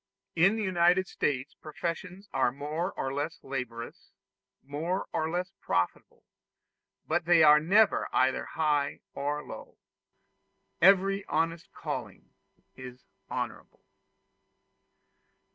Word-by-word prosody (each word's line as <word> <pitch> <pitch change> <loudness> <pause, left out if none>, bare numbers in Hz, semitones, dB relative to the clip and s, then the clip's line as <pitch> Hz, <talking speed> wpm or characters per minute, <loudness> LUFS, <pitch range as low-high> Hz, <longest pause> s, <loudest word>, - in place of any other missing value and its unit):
In 185 +6 +4
the 220 - -2
United 180 0 +3
States 135 -4 -2
professions 180 +5 -6
are 130 -2 +2
more 150 +7 -3
or 135 0 -3
less 145 +4 -3
laborious, 125 -3 -6 0.5
more 160 +7 -3
or 160 -1 0
less 180 +3 -2
profitable; 90 0 -2 0.8
but 165 +2 0
they 170 -1 +6
are 150 0 +8
never 200 +7 +3
either 130 +1 +2
high 150 -3 0
or 145 +1 -2
low: - - -10 1.0
every 195 +1 +5
honest 165 0 -1
calling - - -6 0.4
is 125 -1 -10 0.3
honorable. - - -6
160 Hz, 105 wpm, -29 LUFS, 140-180 Hz, 1.0 s, are